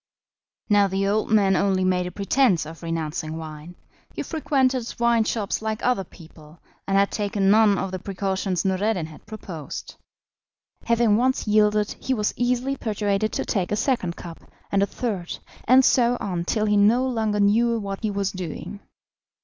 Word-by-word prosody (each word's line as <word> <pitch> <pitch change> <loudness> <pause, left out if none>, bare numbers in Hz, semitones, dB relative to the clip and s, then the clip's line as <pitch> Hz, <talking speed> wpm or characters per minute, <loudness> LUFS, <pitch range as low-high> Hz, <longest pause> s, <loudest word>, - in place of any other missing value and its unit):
Now 205 -2 +4
the 195 +1 -1
old 210 +2 0
man 200 -3 +4
only 190 -1 +1
made 180 -1 +1
a - - -6
pretence 200 - +2
of 160 +1 -10
renouncing 160 -1 -3
wine; 160 +1 -9 0.4
he - - -3
frequented 265 -6 0
wine 235 -1 +3
shops 215 -3 -2
like 220 0 -3
other 245 -6 +2
people, 160 -2 -16 0.3
and 195 0 +2
had 200 0 +3
taken 200 -2 +1
none 215 -2 +5
of 190 - -3
the 185 - -4
precautions 190 -1 -2
Noureddin 190 -1 0
had 155 +4 -14
proposed. 185 -8 -7 0.9
Having 235 -2 +3
once 255 0 +1
yielded, 210 0 +3
he 260 - -1
was 210 -2 -1
easily 250 +2 0
persuaded 210 -2 -1
to - - -2
take 190 -4 -1
a - - +2
second 210 -8 0
cup, 170 -1 -9 0.3
and 200 - +2
a 200 - +2
third, 200 -9 -4 0.3
and 255 +2 +6
so 245 -1 +3
on 180 -5 -3
till 215 +3 0
he 210 -1 +2
no 225 +6 +4
longer 220 -4 -1
knew 230 +3 +3
what 200 -2 -5
he 220 - -1
was 200 -1 -1
doing. 185 +2 -6
205 Hz, 170 wpm, -24 LUFS, 185-225 Hz, 0.9 s, and